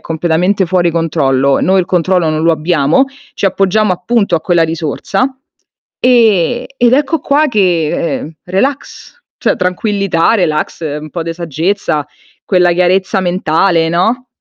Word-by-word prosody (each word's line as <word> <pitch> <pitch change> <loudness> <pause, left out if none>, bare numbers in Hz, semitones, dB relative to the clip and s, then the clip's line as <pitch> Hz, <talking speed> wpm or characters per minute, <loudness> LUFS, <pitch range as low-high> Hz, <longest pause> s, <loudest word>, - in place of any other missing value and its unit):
completamente 175 +4 0
fuori 175 0 +1
controllo, 140 -5 +1
noi 190 +2 +2
il 175 - -3
controllo 180 -1 +1
non 155 0 -2
lo 165 - +3
abbiamo, 160 - +1 0.3
ci - - 0
appoggiamo 195 +1 +1
appunto 200 +2 0
a - - -3
quella 175 0 +1
risorsa, 165 - -2 0.6
e 240 -1 +2
ed 245 -1 +3
ecco 290 +3 0
qua 295 +3 +2
che, 230 -5 -2
e 170 -3 0
ehm, 155 - -8
relax, 265 - -3 0.2
cioè - - +1
tranquillità, 185 0 0
relax, 165 -8 -1 0.2
un 155 0 -10
po' 170 - -4
de 165 0 -4
saggezza, 165 0 -2 0.4
quella 180 -2 +2
chiarezza 185 +2 +1
mentale, 175 -1 +1
no? 220 +10 0
180 Hz, 140 wpm, -13 LUFS, 165-205 Hz, 0.6 s, lo